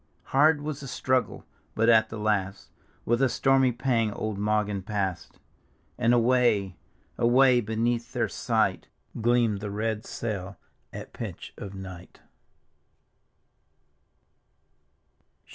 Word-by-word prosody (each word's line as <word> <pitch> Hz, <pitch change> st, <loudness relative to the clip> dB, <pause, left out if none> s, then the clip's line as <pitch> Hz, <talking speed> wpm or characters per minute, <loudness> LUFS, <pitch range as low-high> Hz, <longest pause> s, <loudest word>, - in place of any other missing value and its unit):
Hard 150 Hz, +2 st, +4 dB
was 150 Hz, -1 st, -4 dB
die 140 Hz, -, -8 dB
struggle, 130 Hz, 0 st, -1 dB, 0.3 s
but 115 Hz, +1 st, +2 dB
at 110 Hz, -1 st, +5 dB
the 115 Hz, -, -7 dB
last 100 Hz, -2 st, -2 dB, 0.3 s
With 120 Hz, +2 st, +1 dB
a 135 Hz, -, +4 dB
stormy 135 Hz, 0 st, +3 dB
pang 115 Hz, -3 st, 0 dB
old 105 Hz, -1 st, -4 dB
Mawgan 105 Hz, -1 st, 0 dB
passed, 95 Hz, -3 st, -4 dB, 0.6 s
And 120 Hz, -1 st, +2 dB
away, 120 Hz, -6 st, +2 dB, 0.4 s
away, 125 Hz, +1 st, +5 dB
beneath 115 Hz, +2 st, -1 dB
their -, -, 0 dB
sight, -, -, -1 dB, 0.3 s
Gleamed 115 Hz, -3 st, +2 dB
the 105 Hz, 0 st, -5 dB
red 110 Hz, +1 st, -2 dB
sail 100 Hz, -4 st, -5 dB, 0.3 s
at -, -, -9 dB
pitch -, -, -7 dB
of 100 Hz, -1 st, -8 dB
night. 95 Hz, -2 st, -10 dB
115 Hz, 110 wpm, -27 LUFS, 105-125 Hz, 0.6 s, at